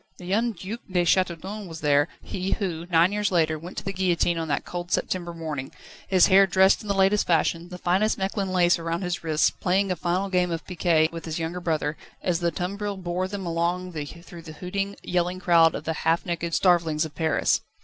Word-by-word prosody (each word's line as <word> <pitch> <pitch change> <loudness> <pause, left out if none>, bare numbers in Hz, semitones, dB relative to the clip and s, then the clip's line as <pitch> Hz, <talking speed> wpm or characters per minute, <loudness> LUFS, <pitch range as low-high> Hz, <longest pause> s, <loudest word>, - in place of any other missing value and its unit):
The 180 - -11
young 225 +6 +1
Duc 200 +5 -6
de 180 -1 +2
Châteaudun 185 +3 0
was 165 -1 -8
there, 145 -1 +3 0.2
he 185 +1 -3
who, 175 -4 -3
nine 170 +2 +4
years 210 0 0
later, 155 -3 +2
went 175 +4 -10
to - - -4
the 195 - -3
guillotine 175 -2 +1
on 165 - -3
that 140 - -1
cold 175 0 -6
September 175 -2 -1
morning, 155 -5 -5 0.4
his 185 -2 +5
hair 195 0 +6
dressed 190 +1 +4
in 210 - -10
the 200 - 0
latest 195 +2 +3
fashion, 170 +1 +1
the 180 - -7
finest 190 +5 +1
Mechlin 195 0 -2
lace 175 -1 +3
around 165 +2 -3
his 175 -2 -3
wrists, 155 -1 +2
playing 190 +1 0
a - - +1
final 180 +3 -1
game 180 -1 +1
of 165 -1 -4
piquet 165 -3 +2
with 165 -1 -7
his 160 -1 -4
younger 165 +2 -3
brother, 155 -3 -1 0.3
as 175 -2 +1
the 170 - +1
tumbril 200 +4 -4
bore 180 0 -2
them 195 -1 -5
along 175 +2 -1
through 170 +3 -8
the 160 -1 -10
hooting, 195 +4 -3
yelling 180 +1 -1
crowd 165 -3 +4
of - - -5
the 160 - -2
half 165 +1 +1
naked 170 -1 -2
starvelings 165 -4 +3
of 155 - -9
Paris. 160 +1 +1
175 Hz, 210 wpm, -25 LUFS, 165-190 Hz, 0.4 s, hair